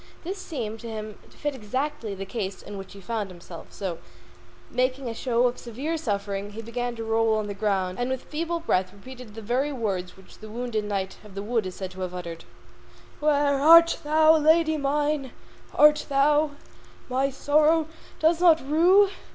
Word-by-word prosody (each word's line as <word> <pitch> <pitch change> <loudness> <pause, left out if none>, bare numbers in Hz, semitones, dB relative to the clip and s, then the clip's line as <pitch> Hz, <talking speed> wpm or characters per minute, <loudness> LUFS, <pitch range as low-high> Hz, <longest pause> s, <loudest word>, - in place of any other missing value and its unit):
This 380 +4 -5
seemed 230 -11 -5
to 235 - -8
him 215 -2 -6
to - - -21
fit 295 -1 -2
exactly 255 -1 -3
the 195 0 -6
case 195 -1 -5
in 205 - -8
which 195 -1 -8
he 200 - -12
found 215 0 -3
himself, 175 -1 -11
so, 180 -4 -5 0.7
making 255 +1 0
a 230 - -3
show 240 +1 +1
of 245 0 0
severe 265 +8 -4
suffering, 205 -7 -3
he 225 +2 -7
began 245 +1 -3
to 225 - -5
roll 225 0 +2
on 215 -1 -1
the 205 - -4
ground 195 -2 -1
and 245 +1 -1
with 260 -1 -3
feeble 335 +2 -3
breath 185 - 0
repeat 250 +6 -12 0.2
the 225 - -7
very 255 +7 0
words 195 -8 -3
which 190 - -17
the 215 - -10
wounded 225 -1 -3
knight 195 -2 -3
of 205 -2 -14
the 200 - -4
wood 220 -2 0
is 185 - -7
said 190 -1 -6
to 190 0 -9
have 180 -1 -4
uttered: 170 -2 -7 0.7
Where 285 -2 +2
art 335 +2 +7
thou, 315 +1 +5
lady 315 +1 +4
mine, 290 -1 -1 0.4
that 300 0 +6
thou 290 +2 +3 0.5
My 265 +2 +1
sorrow 305 +3 +3 0.3
dost 325 +2 +3
not 335 -3 +6
rue? 365 +7 +5
245 Hz, 185 wpm, -26 LUFS, 205-295 Hz, 0.7 s, art